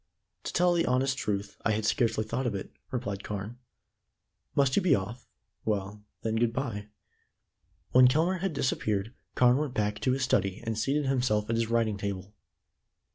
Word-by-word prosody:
"To - - -2
tell 175 +1 +3
the 170 -1 +1
honest 130 +2 +2
truth, 100 -4 -3
I 110 - +2
had 105 0 -1
scarcely 110 -1 +2
thought 125 +4 -2
of 110 - -1
it," 95 - -5 0.2
replied 105 -6 -3
Carne. 105 +4 -5 1.0
"Must 140 -2 +3
you - - +4
be 180 - +4
off? 110 +6 -5 0.4
Well, 105 -1 -2 0.2
then, 110 0 0
good 115 0 +2
bye." 115 -6 -3 1.0
When 125 0 +8
Kelmare 165 +8 +2
had 190 -1 -1
disappeared, 110 -5 -1 0.2
Carne 125 0 +5
went 145 -3 -2
back 105 0 0
to 130 - +1
his 135 0 -1
study, 100 -5 +1
and 115 0 -1
seated 140 +7 0
himself 120 -5 +1
at - - +1
his 115 -1 0
writing 115 -3 +1
table. 100 0 -4
115 Hz, 175 wpm, -29 LUFS, 105-130 Hz, 1.0 s, When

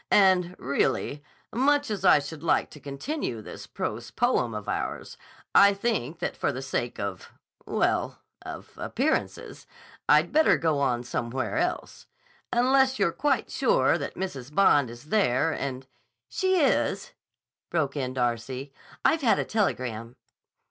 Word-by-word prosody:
And, 185 -3 +4
really, 140 +1 -1 0.3
much 285 +1 +2
as 205 - -3
I - - +7
should 145 +1 -6
like 165 - +1
to 150 - -12
continue 140 - -4
this 110 - -10
prose 115 +2 -4
poem 235 - 0
of 105 -1 -6
ours, - - -4 0.4
I 200 0 +7
think 195 - -2
that - - -3
for - - 0
the 130 - -6
sake 120 -2 -3
of—well, 100 -3 -3 0.2
of - - -9
appearances, - - -2 0.4
I'd 150 +3 +5
better 315 +2 +4
go 160 -3 +1
on 125 -3 0
somewhere 130 - -2
else. 355 +1 -3 0.4
Unless 260 +2 +3
you're 195 -5 +2
quite 290 - 0
sure 485 +1 +2
that - - -5
Mrs. 140 -8 -5
Bond 145 -7 +4
is 120 +1 -11
there 165 - +2
and—" 135 -3 -4 0.4
"She 375 -1 +1
is," 290 - +1 0.6
broke 155 -4 -1
in 130 -2 -3
Darcy. 125 +2 -2 0.3
"I've 320 - +3
had 240 -5 +3
a - - -1
telegram." 125 - -2
150 Hz, 140 wpm, -27 LUFS, -, 0.6 s, I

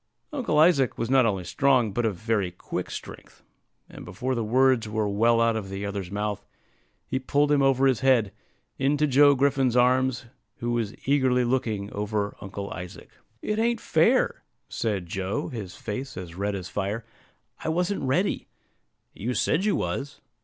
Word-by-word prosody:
Uncle 245 - -1
Isaac 150 -5 +4
was 115 +2 -2
not 130 -3 +5
only 95 -4 -1
strong, 125 +4 +2
but 120 +2 +1
of 105 - -2
very 110 -2 -1
quick 90 - -5
strength; - - -10 0.4
and - - -11
before 125 +7 -3
the 120 -2 -1
words 125 0 +3
were 110 -1 -1
well 115 +3 +3
out 115 -1 +3
of 105 -3 -4
the 95 +1 -4
other's 100 -3 -4
mouth, 105 +1 -3 0.6
he 130 - -2
pulled 145 +3 +1
him 145 -1 +4
over 135 0 +3
his 130 -3 +3
head, 130 -6 +3 0.5
into 145 +3 +2
Joe 145 0 +5
Griffin's 135 -2 +2
arms, 125 0 +2 0.3
who 120 0 -2
was 115 -3 -1
eagerly 130 -3 +3
looking 115 -5 -1
over 105 0 -2
Uncle 100 +2 -6
Isaac. 90 -5 -8 0.3
"It 210 +1 -1
ain't 235 0 +1
fair," - - +2 0.3
said 100 -5 -2
Joe, 95 +3 -3
his 100 -7 -7
face 125 +6 -6
as 90 -3 -7
red 100 +3 -2
as 95 -2 -5
fire; 100 +4 -3 0.6
"I - - -1
wasn't 180 +5 0
ready." 150 +9 0 0.7
"You 120 +5 -3
said 155 - +1
you 210 - +2
was." 140 +1 -3
120 Hz, 165 wpm, -26 LUFS, 100-135 Hz, 0.7 s, not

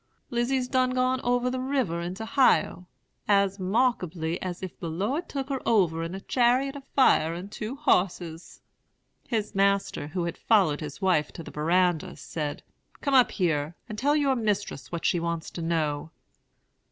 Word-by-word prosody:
Lizy's 250 +2 0
done 255 -1 +1
gone 255 +1 +1
over 245 +1 +1
the 255 - -2
river 255 -11 -1
into 185 +6 -5
'Hio; 225 -7 +2 0.4
as 200 -1 +3
'markably 185 -5 0
as 180 0 -5
if 185 - -7
de 170 - -4
Lord 210 - -2
took 275 -1 -4
her 270 -2 -2
over 175 -7 +2
in 165 +3 -4
a - - -5
chariot 255 +5 +2
of 280 - -8
fire 165 - +4
and 185 +4 -7
two 215 +4 -5
hosses.' 175 - -1 0.7
"His 215 -3 -2
master, 195 -5 +1
who 175 +3 -3
had 170 -1 -4
followed 185 -10 +3
his 150 +5 -7
wife 170 -6 +2
to 165 - -8
the - - -10
verandah, 175 +3 +1
said, 150 -3 -5 0.4
'Come 280 - -1
up 255 -2 +6
here, 160 -4 -1
and 215 - -6
tell 285 +7 +2
your 280 -3 +2
mistress 205 - -2
what 170 -1 -4
she 175 - +2
wants 170 -1 -3
to 170 - -6
know.' 155 -2 -1
195 Hz, 170 wpm, -27 LUFS, 170-250 Hz, 0.7 s, up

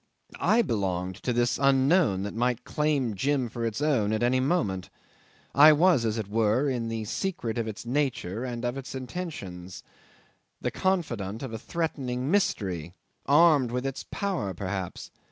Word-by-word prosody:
I 235 +2 +4
belonged 95 - -1
to 125 - -2
this 120 0 +1
Unknown 135 - +3
that 100 - -4
might 120 +1 0
claim 145 -6 0
Jim 130 +4 0
for 115 0 -5
its 115 +5 -2
own 125 -9 +2
at 110 +2 0
any 125 +2 +3
moment. 110 - 0 0.6
I 150 +2 +8
was, 160 -5 +4
as 110 0 0
it 110 -3 -3
were, 110 +5 +2
in 120 -4 -1
the 110 -1 -3
secret 120 - -2
of 115 - -2
its 110 +1 -6
nature 120 -6 -1
and 120 -1 -4
of 120 +2 -2
its 135 - -8
intentions 125 - -6 0.8
the - - -2
confidant 120 - -1
of 130 -4 -5
a 110 - -4
threatening 135 -3 -2
mystery 95 - 0 0.3
armed 145 -3 +5
with 125 +2 -2
its 135 0 -3
power 175 - -2
perhaps! 95 0 -5
120 Hz, 160 wpm, -27 LUFS, 105-145 Hz, 0.8 s, I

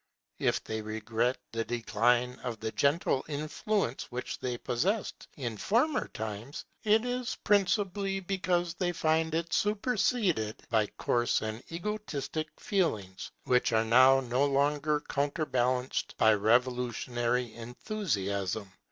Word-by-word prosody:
If - - +1
they 110 0 -4
regret 110 +3 -1
the 115 0 -1
decline 120 +2 +1
of 120 -3 -5
the 110 0 -3
gentle 140 0 +1
influence 155 - -2
which 125 +1 -4
they 125 -1 -2
possessed 190 - -1
in 120 -6 -4
former 250 - +1
times, 110 +5 -6 0.2
it 220 +2 +4
is 250 0 -2
principally 200 -1 +2
because 180 -2 0
they 175 0 -1
find 160 0 +1
it 170 0 -2
superseded 205 - +1
by 110 -2 +3
coarse 120 -2 +1
and 110 +1 -4
egotistic 165 -5 -3
feelings, 110 - -1
which 125 -3 +2
are 110 0 +3
now 130 +4 +6
no 125 +1 0
longer 145 +2 +2
counterbalanced 130 -4 -1
by 110 -1 +5
revolutionary 120 +1 +1
enthusiasm. 110 - -3
130 Hz, 115 wpm, -30 LUFS, 115-175 Hz, 0.2 s, now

